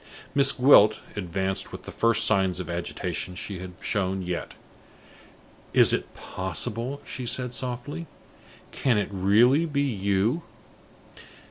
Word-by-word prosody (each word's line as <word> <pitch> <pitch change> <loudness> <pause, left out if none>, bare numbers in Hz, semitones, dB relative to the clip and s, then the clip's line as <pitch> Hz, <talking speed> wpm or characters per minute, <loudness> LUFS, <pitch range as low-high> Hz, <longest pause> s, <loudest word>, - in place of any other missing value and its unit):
Miss 135 -1 +4
Gwilt 125 -5 +6 0.2
advanced 95 0 -3
with - - -9
the - - -8
first 115 0 +3
signs 95 -4 +2
of 85 -2 -5
agitation 85 +1 -4
she 95 +1 -6
had 90 0 -8
shown 95 -2 -1
yet. 90 -1 -4 1.2
"Is - - +5
it - - -3
possible?" 115 - -3
she 125 -2 -6
said, 125 0 0
softly. 130 +7 -5 0.6
"Can 125 -5 +1
it 105 - -1
really 115 - +4
be 140 -2 0
you?" 100 - 0
105 Hz, 125 wpm, -26 LUFS, 95-130 Hz, 1.2 s, Gwilt